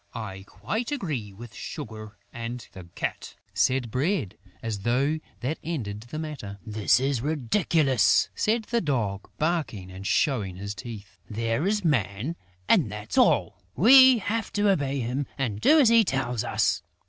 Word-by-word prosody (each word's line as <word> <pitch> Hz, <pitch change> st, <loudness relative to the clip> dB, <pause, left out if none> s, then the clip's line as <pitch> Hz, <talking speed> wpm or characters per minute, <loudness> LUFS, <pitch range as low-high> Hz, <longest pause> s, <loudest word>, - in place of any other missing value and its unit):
"I 95 Hz, -4 st, -6 dB
quite 215 Hz, -, -4 dB
agree 150 Hz, -, -3 dB
with 110 Hz, +3 st, -11 dB
Sugar 110 Hz, -7 st, -8 dB, 0.2 s
and 120 Hz, 0 st, -6 dB
the 95 Hz, -2 st, -11 dB
Cat," -, -, -4 dB, 0.2 s
said 130 Hz, -3 st, +1 dB
Bread, 140 Hz, -, -1 dB, 0.3 s
as 110 Hz, -3 st, -3 dB
though 135 Hz, +9 st, +1 dB, 0.2 s
that 135 Hz, +6 st, -2 dB
ended 110 Hz, -11 st, -4 dB
the 155 Hz, -, -5 dB
matter. 150 Hz, -11 st, -6 dB
"This 110 Hz, +1 st, +2 dB
is 135 Hz, -2 st, 0 dB
ridiculous!" 150 Hz, -, +2 dB
said 225 Hz, +1 st, +1 dB
the 235 Hz, +2 st, -1 dB
Dog, 110 Hz, -, -2 dB
barking 150 Hz, -, -2 dB
and 95 Hz, +2 st, -7 dB
showing 110 Hz, -, +1 dB
his 100 Hz, +2 st, -5 dB
teeth. 105 Hz, -1 st, -10 dB
"There 115 Hz, -, -1 dB
is 205 Hz, -2 st, 0 dB
Man 125 Hz, -, 0 dB, 0.3 s
and 125 Hz, -, +3 dB
that's 105 Hz, 0 st, -6 dB
all!... -, -, +3 dB
We 260 Hz, -, +8 dB
have 220 Hz, +1 st, -2 dB
to 205 Hz, -1 st, +3 dB
obey 140 Hz, -6 st, 0 dB
him 125 Hz, +4 st, -2 dB
and 110 Hz, -6 st, -2 dB
do 315 Hz, -, +6 dB
as 260 Hz, -6 st, +6 dB
he 230 Hz, -1 st, +6 dB
tells 125 Hz, -, -1 dB
us!... -, -, +1 dB
130 Hz, 155 wpm, -26 LUFS, 105-160 Hz, 0.3 s, We